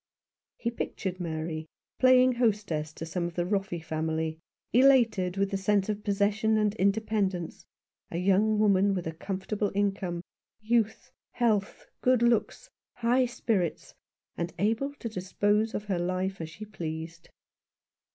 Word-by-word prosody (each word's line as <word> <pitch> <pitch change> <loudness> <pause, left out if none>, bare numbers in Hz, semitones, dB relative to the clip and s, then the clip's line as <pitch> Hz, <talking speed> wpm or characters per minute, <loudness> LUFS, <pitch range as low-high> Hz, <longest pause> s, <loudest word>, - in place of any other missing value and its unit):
He 235 - -2
pictured 190 -5 -4
Mary 160 -2 -4 0.3
playing 255 0 +6
hostess 210 -11 0
to 165 - -6
some 170 +2 -2
of 170 -1 -5
the 175 - 0
Roffey 195 -2 -1
family, 160 0 -2 0.3
elated 230 -8 +4
with 195 0 +1
the 195 - 0
sense 195 +1 +1
of 210 0 -2
possession 210 +2 +2
and 210 -1 +2
independence, 200 -3 0 0.4
a - - -4
young 195 +4 +3
woman 200 -1 +3
with 180 - -3
a 160 - -2
com 185 +4 -5
fortable 205 +1 -1
income, 195 -4 -1 0.4
youth, 225 +2 0 0.2
health, 215 -5 0 0.2
good 250 -2 +3
looks, 235 - +1 0.3
high 245 +2 +2
spirits, 220 -7 -2 0.4
and 170 0 -4
able 225 +9 0
to 240 - -6
dispose 205 +2 0
of 205 - -2
her 190 -4 -1
life 185 +1 -2
as 160 - -5
she 205 +7 -9
pleased. 165 -4 -6
200 Hz, 140 wpm, -28 LUFS, 175-220 Hz, 0.4 s, playing